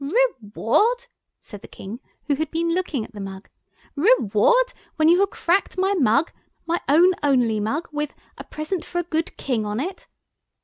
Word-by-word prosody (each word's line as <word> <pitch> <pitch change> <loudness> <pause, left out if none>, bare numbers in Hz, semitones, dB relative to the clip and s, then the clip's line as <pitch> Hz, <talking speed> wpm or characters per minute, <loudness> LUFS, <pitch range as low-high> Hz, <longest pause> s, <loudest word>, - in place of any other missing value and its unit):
"Reward!" 425 - +1 0.4
said 205 -4 -11
the - - -11
King, 205 +5 -9 0.3
who 295 - +1
had 310 +2 -2
been 335 +1 0
looking 330 -10 -1
at - - -17
the 205 - -7
mug, 195 0 -8 0.4
"reward! 455 - +3 0.2
when 310 -1 +3
you 350 +2 +5
have 400 0 +3
cracked 375 +1 0
my 385 +2 +2
mug—my 320 - -1
own 345 +6 +6
only 245 -6 +2
mug, 250 +11 -2
with 295 -1 -3 0.2
'A - - -8
present 310 +3 -4
for 350 - -6
a 350 - +1
good 325 -1 -3
King' 245 -5 -1
on 210 +2 -2
it. 365 +8 -5
310 Hz, 170 wpm, -23 LUFS, 230-360 Hz, 0.4 s, own